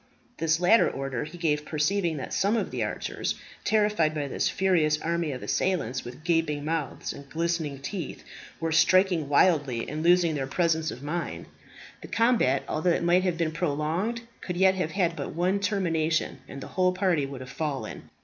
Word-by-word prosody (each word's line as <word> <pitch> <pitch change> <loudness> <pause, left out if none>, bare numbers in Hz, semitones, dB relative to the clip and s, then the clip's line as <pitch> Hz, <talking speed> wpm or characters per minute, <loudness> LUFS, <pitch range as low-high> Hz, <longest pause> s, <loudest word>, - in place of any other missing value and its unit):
This 160 0 +2
latter 180 +6 +5
order 135 0 -3
he 165 +3 -10
gave 150 -3 0
perceiving 160 +2 0
that 135 - -5
some 205 +4 +2
of - - -2
the - - -1
archers, - - -3 0.3
terrified 210 -8 +2
by 145 -2 -2
this - - 0
furious 165 -5 +2
army 170 -1 -1
of 130 - -6
assailants 135 -10 -1
with 125 +5 -10
gaping 165 -3 0
mouths 160 -1 -2
and 140 -1 -12
glistening 165 -3 -1
teeth, 155 +3 -6 0.4
were 165 0 -1
striking 180 -2 +4
wildly, 145 -6 +3
and 155 +1 -4
losing 175 -1 +4
their 135 -3 -2
presence 160 +1 +1
of 130 - -8
mind. 165 +4 -4 0.6
The - - -9
combat, 225 - +2
although 155 +4 0
it 170 - +1
might 175 +2 +4
have 180 -3 0
been 165 -2 0
prolonged, 165 +8 -1 0.2
could 180 -1 -4
yet 190 +1 +5
have 180 -4 -2
had 180 -4 +1
but - - -5
one 185 +4 +1
termination, 165 -6 0
and 140 - -8
the - - -8
whole 185 0 +3
party 180 -7 +1
would 135 -2 -8
have 130 -1 -8
fallen. 150 -4 -4
165 Hz, 180 wpm, -27 LUFS, 150-180 Hz, 0.6 s, latter